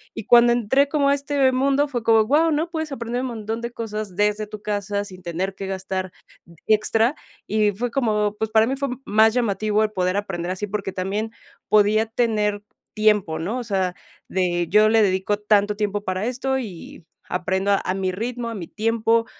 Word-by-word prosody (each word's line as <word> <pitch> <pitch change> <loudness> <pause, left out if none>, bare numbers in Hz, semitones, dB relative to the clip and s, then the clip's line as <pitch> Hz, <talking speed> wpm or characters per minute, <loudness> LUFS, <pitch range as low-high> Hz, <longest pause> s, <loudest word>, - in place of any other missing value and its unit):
y 225 - -6
cuando 240 0 +6
entré 265 +5 +2
como 280 -2 +2
a - - +4
este 280 -2 +1
mundo, 275 +3 +2
fue 245 -4 -3
como: 225 -1 +5
"Guau", 305 +7 +3
¿no?, 320 +3 -1
puedes 315 -3 -3
aprender 245 -1 -3
un 260 - -2
montón 225 -1 -4
de 235 - -3
cosas 215 -5 -5
desde 210 +1 +1
tu 210 -1 -10
casa 205 -1 -2
sin 185 -2 -12
tener 180 +3 -3
que 195 0 -6
gastar 190 -1 -4 0.6
extra, 220 +5 +2 0.3
y 210 0 +2
fue 240 +5 -3
como, 215 -5 0
pues, 220 0 -2
para 220 0 +4
mí 270 - -1
fue 275 0 -2 0.2
más 220 +2 +4
llamativo 215 -3 +1
el 215 - +1
poder 185 0 0
aprender 185 -3 -3
así, 205 +3 -4
porque 195 -1 -3
también 200 +5 -3 0.4
podía 215 +1 +4
tener 215 -3 0 0.3
tiempo, 210 -6 +2
¿no?, 205 +10 -3
o 250 - -3
sea, 190 -4 -1 0.3
de: 175 -2 0
"Yo 210 +2 +5
le 225 0 +4
dedico 190 +1 +1
tanto 210 0 +2
tiempo 205 -1 -2
para 185 +1 -2
esto 265 +1 -1
y 185 -6 -9 0.3
aprendo 190 +2 0
a 185 - -1
mi 190 -1 -1
ritmo, 235 +4 -4
a - - -5
mi 175 -4 -6
tiempo, 225 +1 +1
215 Hz, 190 wpm, -22 LUFS, 195-235 Hz, 0.6 s, cuando